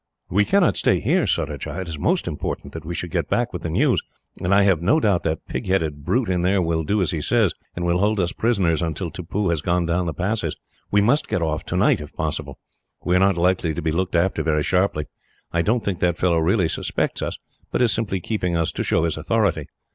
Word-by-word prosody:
"We 105 +4 +3
cannot 195 - +3
stay - - +2
here, - - +1
Surajah. 95 - -2
It 95 - -6
is 80 -3 -5
most - - +1
important - - -4
that 80 - -7
we 85 +2 -5
should 90 -1 -4
get 85 -4 -1
back 120 0 0
with 90 - -4
the 85 - -3
news, 80 - +2 0.4
and 90 - -1
I 100 0 +5
have 95 -5 +3
no 100 - +3
doubt 100 - +2
that 80 -1 -2
pig - - -4
headed 80 -6 0
brute 120 - +1
in 90 -2 0
there 95 +2 +2
will 80 -2 0
do 100 +6 +1
as 90 - +1
he 80 - -2
says, 110 -2 +2 0.2
and 85 - -3
will 85 +1 +2
hold 105 +1 +2
us 85 -2 +1
prisoners 95 -9 +1
until 85 +1 -3
Tippoo 95 +2 -2
has 85 -3 0
gone 85 +1 +1
down 85 +1 0
the 80 - -2
passes. 95 -3 -1 0.3
We 105 - +3
must 130 +9 +2
get 85 - -1
off 80 -1 -1
tonight, - - +2
if 75 - -10
possible. - - -3 0.5
We 90 - +1
are - - +5
not 95 -1 +3
likely 85 -2 +1
to 85 - -3
be 80 - +1
looked 90 +2 -1
after 90 +3 +2
very 75 -2 +1
sharply. 90 -4 +1 0.5
I 85 - +1
don't 110 +6 0
think 95 -4 -1
that 85 -1 +1
fellow 85 -2 +2
really 90 +2 +2
suspects - - -2
us, - - -3 0.3
but - - +1
is 120 - +3
simply 105 -4 -1
keeping 90 -4 -1
us 80 -2 0
to - - -3
show - - +1
his 85 -1 0
authority. 100 +3 0
90 Hz, 240 wpm, -22 LUFS, 80-100 Hz, 0.5 s, I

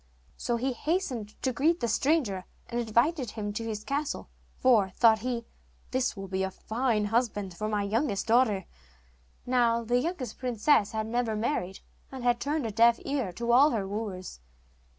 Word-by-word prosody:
So 240 - -1
he 260 +2 -1
hastened 255 - -2
to 260 - +1
greet 320 +7 +2
the 235 - 0
stranger, 235 - +1 0.2
and 240 - -2
invited 240 +4 +1
him 205 -1 -4
to 230 - -3
his 215 -2 -4
castle, 285 +3 -3 0.3
for, 225 -7 +4
thought 220 +3 +4
he, 235 -1 -3 0.5
'this 255 -4 0
will 195 0 -6
be 190 0 -2
a 190 - 0
fine 220 +2 -1
husband 205 -4 0
for 215 +4 -3
my 210 -1 0
youngest 215 +1 0
daughter.' 220 -5 +3 0.8
Now, 235 -2 +2
the 240 +2 +2
youngest 265 - -4
princess 245 -2 +2
had 220 0 -1
never 230 0 -1
married, 210 -5 -2 0.3
and 260 -2 -7
had 240 -1 +2
turned 295 -1 -1
a 225 - -2
deaf 230 +2 +5
ear 270 -9 -1
to 235 +5 -1
all 270 +5 +7
her 210 -8 -2
wooers. 195 - -5
235 Hz, 170 wpm, -28 LUFS, 210-255 Hz, 0.8 s, all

